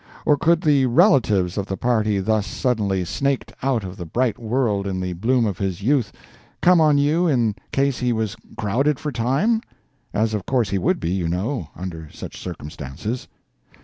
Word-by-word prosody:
Or 150 - +5
could 170 +3 +2
the 140 -4 +3
relatives 115 - +3
of 100 - -3
the 95 - -3
party 110 -4 +1
thus 105 +1 0
suddenly 105 -8 0
snaked 140 +8 -1
out 130 -5 0
of 95 0 -7
the 85 - -6
bright 120 +5 0
world 110 -4 0
in 95 -1 -2
the 90 -1 -2
bloom 115 +7 +1
of 100 -5 -2
his 95 -1 -2
youth 125 -4 +2 0.5
come 180 -2 +5
on 150 -2 +5
you 155 +5 +2
in 120 -8 +2 0.2
case 135 -1 +1
he 125 -1 +1
was 110 -3 -1 0.2
crowded 130 +8 +1
for 150 +1 -4
time?—as, 130 - -1
of 105 -3 -3
course, 120 -7 +1
he 100 - +1
would 180 - +1
be, 85 - -2
you 90 -3 -1
know, 95 - -2
under 80 -3 -7
such - - -9
circumstances. 75 - -6
115 Hz, 180 wpm, -22 LUFS, 95-135 Hz, 0.5 s, Or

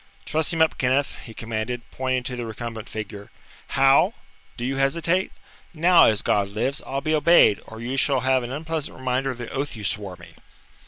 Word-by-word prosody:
"Truss 155 0 0
him 165 -1 +4
up, 160 - 0
Kenneth," 135 +1 +1
he 115 - -10
commanded, 115 +2 -4
pointing 130 -1 -1
to 125 0 -4
the 120 - -4
recumbent 115 -1 -6
figure. 105 -1 -7 0.5
"How? 135 +10 +5 0.4
Do 120 - -3
you 135 +1 -2
hesitate? 165 +7 +1 0.4
Now, 170 +2 +6
as 110 -2 +2
God 100 -1 +1
lives, 130 +8 -2
I'll 135 +1 -2
be 155 +1 0
obeyed; 155 -8 +5
or 110 - -10
you 125 +4 -3
shall 135 -1 +2
have 130 0 +2
an 120 0 -6
unpleasant 160 +1 -4
reminder 130 +1 -1
of 130 - -4
the 120 -1 -7
oath 140 0 -3
you 110 - -8
swore 100 -2 -3
me!" 85 -1 -15
130 Hz, 195 wpm, -24 LUFS, 115-145 Hz, 0.5 s, Now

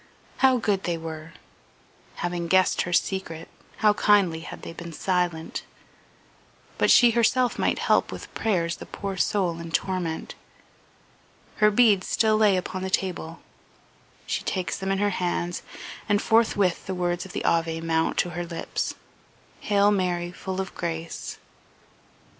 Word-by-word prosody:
How 260 -1 +5
good 205 -4 0
they 170 -1 -1
were! 160 0 -8 0.8
Having 175 -1 -3
guessed 185 +2 +3
her 175 - -3
secret 175 -3 -1 0.4
how 210 - +7
kindly 200 -6 +3
had 165 - -9
they - - -7
been 170 0 -8
silent! 175 -2 -1 1.2
But - - +3
she 240 -2 +7
herself 240 +2 +2
might - - +1
help - - +2
with - - -9
prayers 170 -6 0
the - - -10
poor 200 -1 -5
soul 180 -3 0
in 170 0 -7
torment. 175 -2 -2 1.2
Her 210 - +5
beads 210 -3 +4
still 220 -1 +3
lay 210 -3 +4
upon 185 +1 -4
the 190 - -3
table; 180 -3 -2 0.8
she - - -2
takes 185 -2 -2
them 195 0 -3
in 195 - +1
her 205 +1 +1
hands, 175 -1 -2 0.5
and 205 0 +4
forthwith 220 -6 +2
the 190 - -2
words 175 -1 -1
of 190 - -10
the - - -3
Ave 165 -1 +1
mount 165 0 0
to 175 - +1
her 175 +1 -3
lips, 170 -1 -4 0.6
"Hail 205 0 +3
Mary, 175 -3 0
full 190 +1 -5
of 190 0 -4
grace..." 165 -1 -5
185 Hz, 145 wpm, -25 LUFS, 170-205 Hz, 1.2 s, how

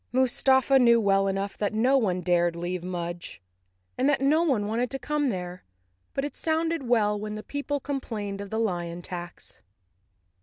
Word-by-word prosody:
Mustafa 265 +1 +3
knew 235 -2 +6
well 195 -2 +3
enough 195 0 -2
that 210 0 -1
no 250 +5 +3
one 190 -9 +1
dared 175 -1 +2
leave 175 +1 -4
Mudge, 175 -1 -5 0.6
and 265 +3 +3
that 280 - +2
no 290 +4 +3
one 265 -11 +1
wanted 235 +4 -1
to 270 - -3
come 295 0 -1
there, 180 -3 -5 0.5
but 275 - 0
it 290 - -6
sounded 325 -3 0
well 210 -3 +2
when 210 0 -5
the 215 - -6
people 285 0 -3
complained 220 -8 -4
of 200 - -7
the 220 - -3
lion 175 -5 -2
tax. 175 -1 -8
215 Hz, 175 wpm, -27 LUFS, 185-270 Hz, 0.6 s, knew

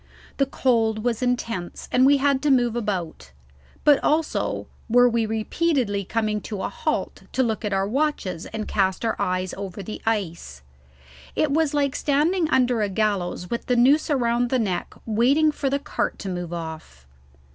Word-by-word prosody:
The 275 - +2
cold 225 -5 +1
was 240 -1 0
intense, 230 -8 -2
and 255 +1 +5
we 285 0 +6
had 275 -1 +2
to 300 - +1
move 245 -4 +3
about; 195 -8 -3 0.5
but 290 -2 +5
also 310 +1 0 0.2
were 245 +2 +6
we 230 -2 +1
repeatedly 220 -1 0
coming 215 0 -1
to 205 -2 -5
a - - -1
halt 475 -1 -3
to 260 - +2
look 225 -2 -2
at 210 - -2
our 195 0 +1
watches 225 - -1
and 220 -1 -5
cast 190 +2 0
our 225 - 0
eyes 185 0 -1
over 195 0 -6
the 215 - -7
ice. 170 - -2 0.7
It 305 - +1
was 305 0 +1
like 280 -2 +1
standing 310 +4 +1
under 250 -4 +2
a 205 - 0
gallows 190 -3 -1
with 235 - -3
the 250 - +2
noose 275 +7 +4
around 245 -3 +1
the 260 - +2
neck 200 -7 -2
waiting 260 +8 +3
for 285 -2 -2
the 280 - +1
cart 280 - -3
to 195 - -6
move 175 -2 -4
off. 160 - -7
230 Hz, 175 wpm, -24 LUFS, 200-275 Hz, 0.7 s, we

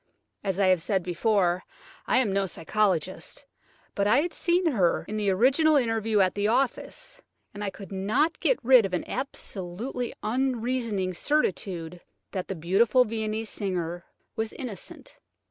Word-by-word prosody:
As 195 -1 -2
I 200 - +4
have 185 -2 +4
said 190 +1 0
before, 180 0 +1 0.4
I - - +3
am 230 -7 +2
no 195 0 +1
psychologist, 185 0 -1 0.5
but 200 0 +1
I 240 +7 +5
had 340 0 -3
seen 350 +1 +1
her 185 -9 +1
in 215 - -4
the 210 -2 0
original 270 - +4
interview 225 -5 +2
at 185 -1 +2
the 205 0 0
office, 270 - -1 0.3
and 205 0 -6
I 200 - -1
could 195 0 -11
not 215 - 0
get - - +2
rid 250 -1 +7
of 190 -2 -1
an - - -4
absolutely 235 -2 -4
unreasoning 230 -5 -1
certitude 180 - -1 0.3
that 185 -2 -4
the 195 - -4
beautiful 215 +10 +3
Viennese 220 0 -3
singer 175 -4 -3 0.3
was 220 0 -2
innocent. 240 -7 -8
210 Hz, 150 wpm, -27 LUFS, 185-250 Hz, 0.5 s, rid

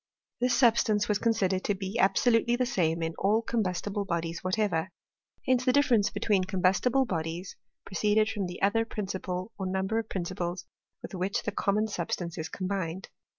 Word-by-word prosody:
This 250 0 +2
substance 220 -4 +3
waa 210 - +2
considered 190 -5 +1
to 205 - +1
be 195 +2 -4
absolutely 230 +4 +3
the 250 +1 +1
same 170 -9 0
in 165 0 -2
all 215 +4 +2
combus 205 -7 -1
tible 205 0 -2
bodies 165 -1 -2
whatever; 185 -3 0 0.6
hence 255 -1 +2
the 255 - +3
diflFerence 250 -7 +3
between 200 -4 +1
combustible 195 +8 +2
bodies 170 -2 -4 0.3
proceeded 210 +2 +2
from 205 -4 -2
the 180 +1 -7
other 215 +3 +3
principle 190 -2 -4
or 190 - -2
number 190 +4 0
of 225 - -5
principles 175 -1 -3 0.4
with - - -8
which 190 +1 -1
this 210 - -3
common 210 +2 +1
sub 180 -6 -4
stance 170 -2 -3
is 160 - -4
combined. 185 -1 -3
195 Hz, 170 wpm, -29 LUFS, 180-220 Hz, 0.6 s, substance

